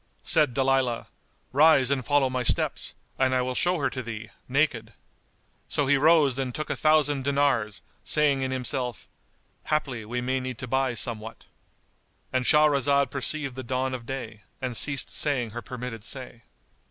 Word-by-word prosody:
'" - - -40
Said 150 -7 +3
Dalilah, 135 -3 +1 0.5
"Rise 140 -2 +5
and 135 -2 0
follow 145 +1 +2
my 130 0 -2
steps, 120 - 0 0.2
and 130 -1 +2
I 125 - +2
will 130 0 -2
show 175 +7 +1
her 140 -3 0
to 130 - -4
thee, 110 -2 -7 0.2
naked."[FN#193] 125 -5 0 0.8
So 145 - 0
he 140 +2 +4
rose 145 -2 +4
and 130 -2 -3
took 155 - -3
a - - 0
thousand 150 -3 +2
dinars, 135 -7 0 0.2
saying 145 -3 +2
in 130 - -1
himself, 130 -2 -2 0.6
"Haply 135 -7 -1
we 120 +3 -3
may 130 +2 -1
need 130 -2 -5
to 125 - -6
buy 130 0 0
somewhat"——And 115 +2 -6
Shahrazad 140 -2 +3
perceived 140 0 -1
the 130 - -6
dawn 130 +1 -2
of 120 -2 -6
day 115 -5 -6 0.2
and 125 -2 -4
ceased 140 +1 +2
saying 130 -7 +1
her 120 +2 -6
permitted 125 -3 -7
say. 125 -2 -8
130 Hz, 165 wpm, -26 LUFS, 125-140 Hz, 0.8 s, Rise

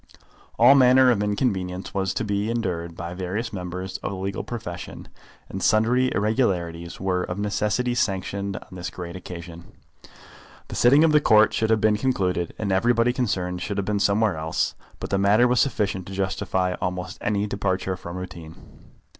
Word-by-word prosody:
All 120 +4 +8
manner 130 -1 +6
of 105 -4 +1
inconvenience 100 -4 -2
was 95 -1 0
to - - -1
be 100 0 -1
endured 90 -8 -3
by 85 +1 -6
various 95 +6 -4
members 90 0 -5
of - - -4
the 100 - -5
legal 95 +1 -3
profession, 90 -7 -7 0.4
and 95 - -6
sundry 120 +6 +3
irregularities 90 -6 -1
were 95 -1 0
of 90 0 -4
necessity 105 +4 0
sanctioned 100 -2 -2
on - - -12
this 90 0 -5
great 85 -2 -8
occasion. 85 -2 -9 1.0
The - - -6
sitting 140 +6 +5
of 165 - +4
the 150 -1 +5
Court 110 -5 +5
should 110 - 0
have 110 -1 +3
been 105 -1 +3
concluded, 90 -9 -1
and 100 -3 -2
everybody 115 +5 +3
concerned 90 -8 -2
should 100 +1 -3
have 100 - -1
been 105 0 0
somewhere 100 -2 +2
else, 80 +1 -1 0.3
but - - -6
the 100 - +2
matter 105 +5 +4
was 125 -1 +2
sufficient 100 -9 0
to 95 - -7
justify 95 -1 -1
almost 90 +1 -4
any 105 -1 0
departure 95 -2 -1
from 85 0 -8
routine. 85 -3 -8
100 Hz, 170 wpm, -24 LUFS, 90-110 Hz, 1.0 s, All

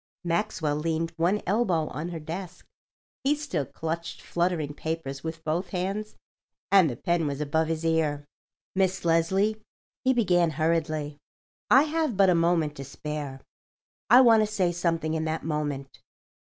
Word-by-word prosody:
Maxwell 165 -4 0
leaned 165 +1 -1
one 175 +6 +1
elbow 185 -5 +1
on 160 +4 -5
her 170 -2 -5
desk. 175 +3 -7 0.6
He 280 +2 +3
still 290 - -3
clutched 165 +4 -5
fluttering 170 -4 -1
papers 150 -3 -4
with 160 0 -5
both 165 +4 -1
hands 195 +3 -3 0.6
and 190 -5 +6
the 120 - -4
pen 170 +4 0
was 140 -1 -3
above 155 +2 0
his 165 0 -2
ear. 155 -3 +1 0.5
"Miss 190 -1 0
Leslie," 190 +6 +2 0.4
he 260 - +4
began 180 -9 +3
hurriedly, 155 -2 0 0.5
"I 265 +3 +7
have 310 -7 -1
but 195 -2 +6
a - - +5
moment 165 -3 +2
to 135 - -5
spare. 140 -1 -6 0.7
I 245 +4 +9
want 230 -3 +6
to 215 - +2
say 185 -4 +1
something 165 -2 -1
in 160 0 -1
that 160 0 -3
moment. 145 -3 -3
165 Hz, 150 wpm, -27 LUFS, 155-190 Hz, 0.7 s, I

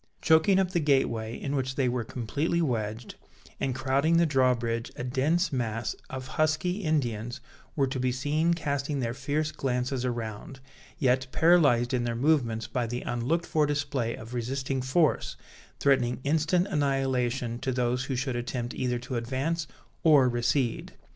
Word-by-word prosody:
Choking 160 +4 +4
up 190 -2 +1
the 175 - +1
gateway, 120 -6 +1
in 140 0 -3
which 130 -1 -2
they 135 -3 +1
were 120 -1 -1
completely 140 +9 -2
wedged, 115 -6 -2 0.5
and 130 -2 -1
crowding 135 +5 +2
the 170 - +5
drawbridge, 125 -5 +1
a - - -5
dense 145 +8 +1
mass 115 -3 -2
of 130 0 -6
"husky" 155 +7 0
Indians 120 -6 -1 0.4
were 140 - +2
to 130 0 -3
be 125 0 +1
seen 150 +6 +1
casting 140 -2 -2
their 120 -2 -1
fierce 145 +4 -1
glances 125 -1 -2
around, 120 +1 -4 0.4
yet 130 -1 +2
paralyzed 145 -8 +4
in 125 -1 +1
their 120 -1 -2
movements 120 -5 +1
by 120 0 -2
the 120 +2 -4
unlooked 130 +8 -1
for 150 -2 +1
display 140 -5 -1
of 115 +2 -10
resisting 130 +2 -2
force, 140 +5 +1 0.4
threatening 130 -3 +2
instant 160 +5 +2
annihilation 135 - 0
to 130 - -2
those 125 0 0
who 135 - -2
should 130 0 -2
attempt 120 0 -3
either 125 -1 -1
to 125 +1 -4
advance 135 +7 -2 0.3
or 145 -5 +6
recede. 120 0 0
130 Hz, 155 wpm, -28 LUFS, 120-150 Hz, 0.5 s, or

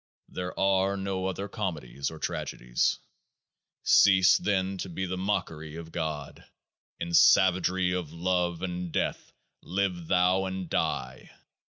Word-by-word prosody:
There 90 0 -5
are 95 0 +2
no 95 -1 -2
other 95 +1 -3
comedies 75 - -4
or 80 - -9
tragedies. - - -1 0.9
Cease 95 -2 +6
then 95 -1 -1
to 95 - -4
be 95 +2 -3
the 95 0 -3
mockery 80 -5 -3
of 80 -1 -8
God; 80 -4 -4 0.6
in 85 0 -4
savagery 90 +1 +4
of 90 -4 -3
love 90 0 -1
and 90 -1 -4
death - - -2 0.3
live 90 -2 -2
thou 90 +1 +3
and 95 -1 -4
die - - -2
90 Hz, 130 wpm, -28 LUFS, 85-95 Hz, 0.9 s, Cease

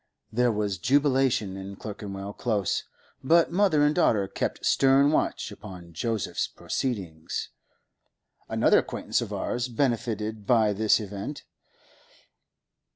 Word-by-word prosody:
There 120 +1 +2
was 105 -4 -2
jubilation 130 - +2
in 95 +1 -7
Clerkenwell 100 -1 -7
Close, 105 -6 -1 0.4
but 165 +5 +4
mother 175 -5 +3
and 150 +1 +4
daughter 110 - +2
kept - - -3
stern 135 +2 +4
watch - - 0
upon 85 -2 -11
Joseph's 110 +5 -2
proceedings. 95 - -4 1.0
Another - - +4
acquaintance - - -2
of - - -5
ours 120 0 -2
benefited 110 -4 -2
by 110 -4 +4
this 110 +2 +3
event. 105 +7 -6
110 Hz, 110 wpm, -27 LUFS, 100-135 Hz, 1.0 s, but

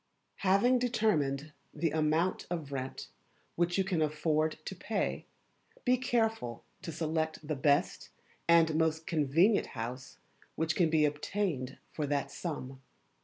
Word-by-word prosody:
Having 200 +7 +4
determined 155 - +1 0.2
the 155 +1 0
Amount 160 +3 +1
of 160 -5 -4
Rent 130 -1 -5 0.5
which 175 +1 +1
you 195 - +3
can 185 -4 0
afford 155 +1 +1
to - - -5
pay, - - -2 0.6
be 250 0 +5
careful 225 - -1 0.2
to 180 -3 -5
select 160 -1 -2
the 155 - -1
best 140 +1 +1 0.4
and 165 -1 +5
most 160 0 +1
convenient 165 +7 +3
house 125 +3 -5 0.4
which 160 0 0
can 170 -3 +3
be 155 -1 +4
obtained 150 -3 -2
for 150 -2 -2
that 140 0 -1
sum. 135 -6 -5
160 Hz, 130 wpm, -32 LUFS, 145-175 Hz, 0.6 s, be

